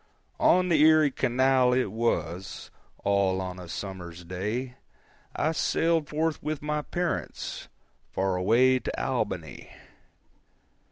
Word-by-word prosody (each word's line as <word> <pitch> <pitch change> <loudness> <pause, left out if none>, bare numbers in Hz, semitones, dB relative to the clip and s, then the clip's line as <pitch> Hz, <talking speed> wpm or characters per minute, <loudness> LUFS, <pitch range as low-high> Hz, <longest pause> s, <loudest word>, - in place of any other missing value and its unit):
On 180 +1 +4
the 160 -3 +4
Erie 155 -2 +6
Canal, 130 0 +3
it 125 -6 +1
was, 95 -5 -2 0.3
All 100 -2 +2
on 90 -1 -5
a 90 - -9
summer's 90 -1 -7
day, 105 +9 -4 0.6
I 155 - +1
sailed 165 -1 +1
forth 155 0 -1
with 150 -1 -4
my 150 0 -1
parents 175 +3 -4 0.4
Far 95 -1 0
away 120 +8 +4
to - - -4
Albany. - - -3
125 Hz, 115 wpm, -27 LUFS, 95-150 Hz, 0.6 s, Erie